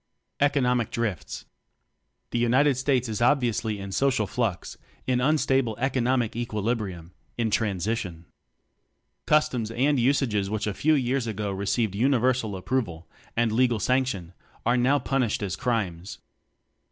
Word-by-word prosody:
Economic 125 -5 +2
Drifts. 100 - -3 0.9
The 120 - 0
United 130 +4 +3
States 130 -1 +1
is 110 0 -3
obviously 120 -4 +1
in 100 0 -6
social 130 0 +1
flux, 110 -4 -2 0.3
in 125 -1 +1
unstable 135 -5 +2
economic 125 -2 +1
equili 115 -1 -1
brium 90 -6 -7 0.3
in 115 -2 0
transition. 100 -4 -1 1.0
Customs 130 -7 +2
and 135 +4 +1
usages 120 -6 +1
which 110 0 -2
a 105 - -1
few 155 +8 +2
years 130 -2 0
ago 105 -2 -3
received 100 +2 -1
universal 125 -1 +1
approval 95 -4 -3 0.3
and 115 -1 +2
legal 120 0 +2
sanction 125 -9 0 0.3
are 120 - +3
now 125 +3 +3
punished 125 -5 -1
as 95 -2 -2
crimes. 95 -7 -2
120 Hz, 130 wpm, -26 LUFS, 105-130 Hz, 1.0 s, United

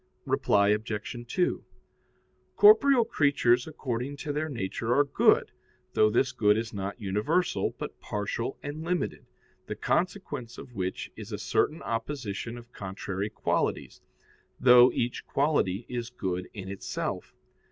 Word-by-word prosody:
Reply 100 0 +3
Obj. 105 +2 -2
2: 180 +9 0 0.9
Corporeal 280 - +7
creatures 140 - +2
according 135 -2 -4
to 145 +1 -4
their 155 +2 -2
nature 115 0 -2
are 145 - +5
good, 140 - +3 0.4
though 110 - +4
this 120 +4 +2
good 105 -1 +3
is 115 0 -3
not 100 +2 -4
universal, 110 - 0
but - - -7
partial 105 +4 -3
and 150 +2 -5
limited, 175 +1 -2 0.4
the - - -4
consequence 120 -1 -2
of 125 - -10
which 95 -3 -4
is - - -9
a - - -3
certain 155 - 0
opposition 115 -1 -4
of 120 +1 -13
contrary 95 +1 -4
qualities, - - -2 0.6
though 125 0 +8
each 120 +1 -2
quality 130 -8 +1
is 120 -1 -4
good 90 -7 -4
in 95 -3 -8
itself. 100 0 -4
120 Hz, 130 wpm, -28 LUFS, 105-145 Hz, 0.9 s, though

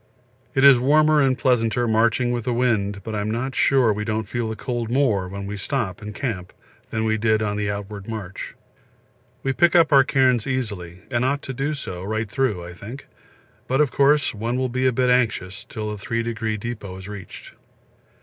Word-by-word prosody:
It 135 - +3
is 140 -3 +8
warmer 150 +3 +4
and 130 -2 +2
pleasanter 120 -1 +1
marching 115 +2 +2
with 120 -2 -2
the 125 -2 0
wind, 105 -5 0
but 110 - -5
I'm 105 0 -2
not 125 +4 -2
sure 125 -4 +3
we 105 +1 -3
don't 110 -1 -2
feel 115 +1 -2
the 110 - -4
cold 120 -1 -3
more 120 -8 +1
when 100 +1 -6
we 100 +1 -5
stop 105 -3 -2
and 105 0 -6
camp 105 -10 -4 0.4
than 110 -1 -2
we 110 0 +1
did 110 0 +2
on 105 -1 -1
the 105 0 -1
outward 100 0 -5
march. 105 -5 -6 0.9
We 135 - 0
pick 175 +4 +3
up 165 -3 +5
our 135 -1 +8
cairns 130 -4 +2
easily, 100 -9 -4
and 120 -1 +1
ought 140 +3 0
to 135 - -5
do 140 +4 -2
so 90 -10 -6
right 110 +3 -2
through, 115 -10 0
I 90 - -8
think; 110 +10 -9 0.6
but, 135 +2 +1
of 150 -4 +3
course, 140 +1 +3
one 115 +3 -2
will 130 0 0
be 130 +2 +1
a - - +4
bit 125 +1 +2
anxious 110 -6 0
till 105 -1 -5
the 105 - -6
Three 115 +3 -2
Degree 110 -1 -2
Depot 105 -4 -6
is 95 +1 -9
reached. 105 -2 -9
115 Hz, 205 wpm, -23 LUFS, 105-130 Hz, 0.9 s, is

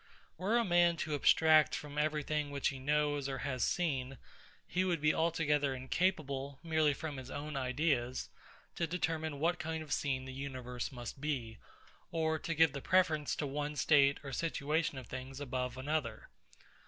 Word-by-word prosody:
Were 200 +7 +1
a 235 - +2
man 175 -2 +4
to 155 - -2
abstract 155 +2 +5
from 150 0 -5
every 150 0 +1
thing 150 0 -1
which 140 -1 0
he 135 - -6
knows 145 0 +1
or 135 - -3
has 130 -4 -1
seen, 135 -6 -1 0.5
he 180 +2 +1
would 175 -3 0
be 150 +1 +3
altogether 150 -4 +1
incapable, 140 -1 -1
merely 155 -3 +2
from 150 -2 -5
his 130 0 -8
own 150 +1 -5
ideas, 130 -1 0 0.5
to 170 - 0
determine 160 -3 -2
what 175 +3 +1
kind 160 0 -3
of 150 -3 -3
scene 130 -2 -1
the 130 - -7
universe 130 -2 -5
must 125 +1 -7
be, 125 -8 -3 0.5
or 160 -1 0
to 165 +1 -3
give 160 -2 +5
the 140 - -5
preference 160 -5 +2
to 150 - -2
one 145 +1 -3
state 140 0 +4
or 140 -1 -6
situation 155 0 -1
of 130 - -7
things 130 +2 -7
above 125 -2 -3
another. 130 -5 -2
145 Hz, 170 wpm, -34 LUFS, 135-160 Hz, 0.5 s, abstract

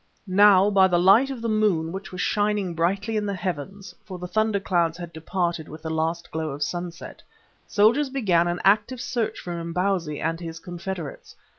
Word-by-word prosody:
Now 200 0 +5
by 190 -1 +5
the 175 -2 +2
light 195 +10 +5
of 255 -4 -6
the - - 0
moon 205 -7 +1
which 190 +2 -7
was 185 - -4
shining 205 -3 0
brightly 195 +7 0
in 210 -1 -1
the 200 - -2
heavens, 185 +2 -5
for 190 -4 -8
the 180 0 -6
thunder 215 +1 +1
clouds 170 -3 0
had 170 -1 -8
departed 170 0 -2
with 155 +1 -10
the 160 - -3
last 165 +2 -2
glow 160 0 -3
of 145 +1 -3
sunset, 175 +2 -6 0.5
soldiers 235 +8 +3
began 190 -11 +2
an 175 0 -2
active 210 +6 +3
search 235 -2 -2
for 175 - -6
Imbozwi 170 -2 -1
and 165 +1 -2
his 165 -1 -7
confederates. 175 -2 -7
185 Hz, 185 wpm, -24 LUFS, 170-205 Hz, 0.5 s, Now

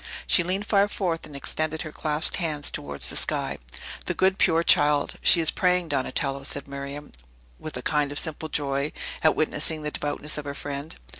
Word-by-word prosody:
She - - +5
leaned 185 +4 -1
far 200 -1 +3
forth, 175 -5 -2
and 145 - -12
extended 155 +3 -3
her 155 - -7
clasped 150 0 -1
hands 155 -5 -1
towards 70 0 -1
the - - -3
sky. - - +2 0.5
"The - - -1
good, 190 0 +2
pure 165 -2 +4
child! 145 -2 +3
She 170 - +6
is 160 - +4
praying, 180 -2 +1
Donatello," 140 0 -1
said 140 +1 -3
Miriam, 140 +1 -7 0.5
with 155 - -6
a - - -7
kind 150 -2 0
of 145 - -5
simple 160 0 +1
joy 140 0 -1 0.3
at 155 - +4
witnessing 155 0 0
the 150 - -3
devoutness 150 +1 -3
of 145 - -8
her 140 0 -5
friend. 145 +2 -6
150 Hz, 190 wpm, -25 LUFS, 145-165 Hz, 0.5 s, She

